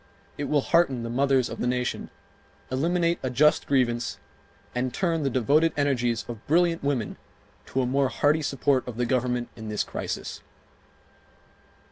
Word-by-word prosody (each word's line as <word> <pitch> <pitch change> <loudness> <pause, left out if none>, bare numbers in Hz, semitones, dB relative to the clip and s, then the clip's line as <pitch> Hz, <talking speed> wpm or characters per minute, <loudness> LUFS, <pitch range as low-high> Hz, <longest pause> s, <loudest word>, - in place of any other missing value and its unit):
It 145 - -3
will 145 -1 +2
hearten 135 -7 +2
the 115 - -4
mothers 135 -1 +2
of - - -7
the - - 0
nation, 125 0 -2 0.6
eliminate 170 +5 +1
a 130 - -2
just 150 +5 +3
grievance, 120 -4 +1 0.6
and 125 +1 -1
turn 165 -1 0
the 140 - +1
devoted 145 +6 +3
energies 125 -5 +1
of 115 -2 -7
brilliant 170 +1 +2
women 135 -6 -1 0.5
to 130 - 0
a - - 0
more 135 +1 +1
hearty 150 +4 +2
support 135 -2 +1
of 120 -2 -6
the 125 - +1
Government 125 -1 0
in 110 -1 -7
this 105 - 0
crisis. - - -5
130 Hz, 155 wpm, -26 LUFS, 125-145 Hz, 0.6 s, just